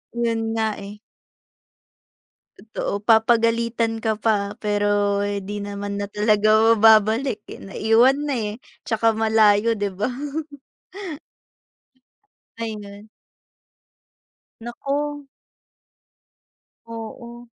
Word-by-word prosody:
'Yon 230 -1 0
nga, 220 -1 0
eh. 200 +1 -8 1.6
Totoo, 215 -2 -4
papagalitan 230 +1 +2
ka 220 -1 0
pa 205 -3 0
pero 205 -1 +1 0.2
di 205 0 -4
naman 200 0 -5
na 200 0 -3
talaga 215 +2 +4
mababalik, 220 +3 +4
eh, - - -10
naiwan 225 +7 +3
na, 280 - -1
eh, 210 -3 -2 0.3
'tsaka 225 0 +1
malayo, 220 0 +3
di 205 -2 -1
ba? 210 +7 -1 2.5
Ayun. 210 -2 -7 1.5
Naku. 285 +5 -4 1.6
Oo. 235 +1 -9
220 Hz, 80 wpm, -22 LUFS, 205-230 Hz, 2.5 s, talaga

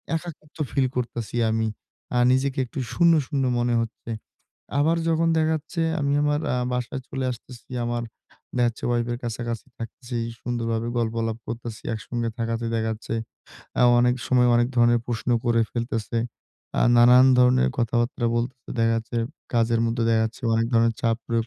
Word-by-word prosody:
একাকিত্ব 160 -2 -7
ফিল 135 -2 +2
করতেছি 120 -2 -3
আমি। 110 0 +1 0.5
আ - - +3
নিজেকে 135 +1 +1
একটু 130 - -7
শূন্য-শূন্য 155 -5 +3 0.2
মনে 120 0 +1
হচ্ছে। 115 0 -6 0.7
আবার 165 +3 +3
যখন 165 0 +2
দেখা 155 0 +2
যাচ্ছে 160 +2 -4 0.2
আমি 140 -1 0
আমার 145 0 +2
আ - - +1 0.2
বাসায় 125 +1 -3
চলে 135 -1 -2
আসতেছি, 120 0 -11 0.2
আমার 120 0 -2 0.5
দেখা 120 -1 +3
যাচ্ছে 115 - -12
Wife 120 0 0
এর - - -3
কাছাকাছি 120 +1 -4
থাকতেছি, 120 +2 -6 0.2
সুন্দরভাবে 115 -1 -2
গল্প-আলাপ 115 -1 -1
করতেছি। 115 -1 -6
একসঙ্গে 115 +2 -3
থাকাতে 115 0 -2
দেখা 110 - 0
যাচ্ছে 110 +1 -6 0.9
অনেক 125 0 +4
সময় 125 -1 +4
অনেক 120 0 +4
ধরনের 120 0 +4
প্রশ্ন 120 0 -2
করে 120 -1 +3
ফেলতেছে। 115 -1 -2 0.6
আ - - +4
নানান 125 +2 +8
ধরনের 125 - +5
কথাবার্তা 120 +1 0
বলতেছে 120 +1 -3
দেখা 115 0 +3
যাচ্ছে, 115 +1 -3 0.4
কাজের 115 0 +2
মধ্যে 115 0 -1
দেখা 110 -1 +3
যাচ্ছে 110 +3 -6
অনেক 115 0 +2
ধরনের 115 0 +3
চাপ 115 -1 +2
প্রয়োগ 115 0 0
120 Hz, 155 wpm, -24 LUFS, 115-130 Hz, 0.9 s, নানান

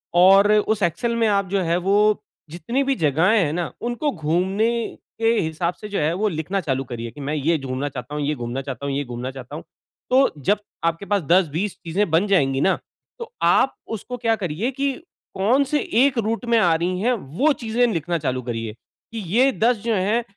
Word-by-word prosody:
और 195 +3 +6
उस 215 0 +1
एक्सेल 230 +8 0
में 230 -1 +2
आप 200 -1 +2
जो 195 0 +1
है, 170 -1 +1
वो 205 +3 +2 0.3
जितनी 235 - -2
भी 270 0 +1
जगहें 165 - +3
हैं 160 -8 +1
न, 170 -1 -2
उनको 240 +5 -1
घूमने 185 - 0 0.5
के 225 0 +3
हिसाब 170 +2 -1
से 210 - -9
जो 200 - -2
है, 150 +2 +1
वो 205 +5 0
लिखना 170 +3 -2
चालू 135 -5 -1
करिए। 120 -2 -6
कि 145 - -11
मैं 140 +2 -3
ये 155 +3 +1
घूमना 135 0 -3
चाहता 140 +2 -7
हूँ, 150 - -2
ये 150 +1 0
घूमना 120 +1 -4
चाहता 135 0 -6
हूँ, 140 - -2
ये 145 - -1
घूमना 125 0 -5
चाहता 130 +1 -9
हूँ। 160 - -7 0.5
तो 265 +2 +5
जब 200 +9 +1 0.2
आपके 165 +3 -1
पास 200 0 +1
10-20 175 +3 +1
चीजें 185 +5 0
बन 170 +6 +3
जाएँगी 135 -9 +2
न, 190 - +3 0.4
तो 470 -1 -7
आप - - +3
उसको 230 +3 -5
क्या 230 -2 +1
करिए, 195 - -2
कि 275 +1 -1 0.4
कौन-से 265 +9 +2 0.2
1 275 -2 +2
रूट 230 +2 -1
में 235 -1 +3
आ 175 -6 +4
रही 180 +3 -1
हैं, 245 +4 +2
वो 215 - 0
चीजें 240 -1 0
लिखना 170 +1 -1
चालू 130 -5 -2
करिए। 115 -3 -4
कि 225 - -12
ये 260 +4 +5
10 240 0 +2
जो 230 -1 0
हैं, 210 +5 +1
185 Hz, 205 wpm, -22 LUFS, 150-225 Hz, 0.5 s, और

